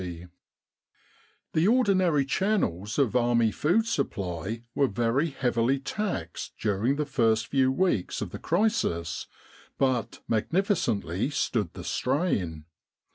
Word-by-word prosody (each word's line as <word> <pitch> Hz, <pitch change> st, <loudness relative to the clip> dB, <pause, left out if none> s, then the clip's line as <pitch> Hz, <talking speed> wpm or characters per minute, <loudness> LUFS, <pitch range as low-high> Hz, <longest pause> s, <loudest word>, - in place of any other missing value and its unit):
in 90 Hz, -, -4 dB
Egypt 85 Hz, +1 st, -13 dB, 1.2 s
The 160 Hz, +4 st, +3 dB
ordinary 185 Hz, -, +3 dB
channels 120 Hz, -, 0 dB
of 130 Hz, -5 st, +2 dB
Army 120 Hz, -2 st, +3 dB
food 180 Hz, -, +2 dB
supply 100 Hz, -, -3 dB
were 140 Hz, -, +3 dB
very 120 Hz, +8 st, +1 dB
heavily 125 Hz, -1 st, +1 dB
taxed 140 Hz, -, -4 dB
during 110 Hz, +6 st, +1 dB
the 150 Hz, +1 st, -1 dB
first 115 Hz, -5 st, +2 dB
few 130 Hz, 0 st, +2 dB
weeks 135 Hz, -, 0 dB
of -, -, -4 dB
the -, -, -7 dB
crisis, 170 Hz, -, 0 dB, 0.5 s
but 130 Hz, -5 st, 0 dB
magnificently 115 Hz, -, 0 dB
stood 115 Hz, -, -1 dB
the -, -, -7 dB
strain. 100 Hz, -, -1 dB
125 Hz, 120 wpm, -27 LUFS, 105-160 Hz, 1.2 s, The